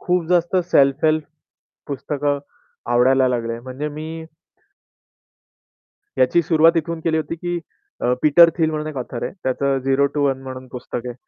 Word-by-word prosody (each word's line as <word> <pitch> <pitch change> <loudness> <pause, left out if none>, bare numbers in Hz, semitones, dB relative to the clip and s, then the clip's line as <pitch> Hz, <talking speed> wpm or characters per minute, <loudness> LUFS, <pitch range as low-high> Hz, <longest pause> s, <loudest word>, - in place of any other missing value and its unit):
खूप 180 -2 0
जास्त 175 +1 +2
सेल्फ-हेल्प 150 +3 +3 0.6
पुस्तकं 145 0 -2 0.5
आवडायला 130 +2 +4
लागले. 115 -1 -2
म्हणजे 130 +4 -5
मी 160 +1 -6 1.9
याची 130 +7 +3
सुरुवात 165 +1 +4
इथून 165 +1 -2
केली 160 0 0
होती, 160 +1 -3
की 175 +1 -3 0.4
अ, 125 - +2
पीटर 165 +3 +7
थिल 160 -1 +2
म्हणून 155 0 -3
एक 150 - -6
ऑथर 125 -1 -5
आहे. - - -3
त्याचं 135 +1 0
झेरो 135 +2 +2
टु 145 - -1
वन 135 -1 -2
म्हणून 130 -1 -8
पुस्तक 125 -1 -6
आहे. 120 - -5
145 Hz, 150 wpm, -21 LUFS, 130-160 Hz, 1.9 s, पीटर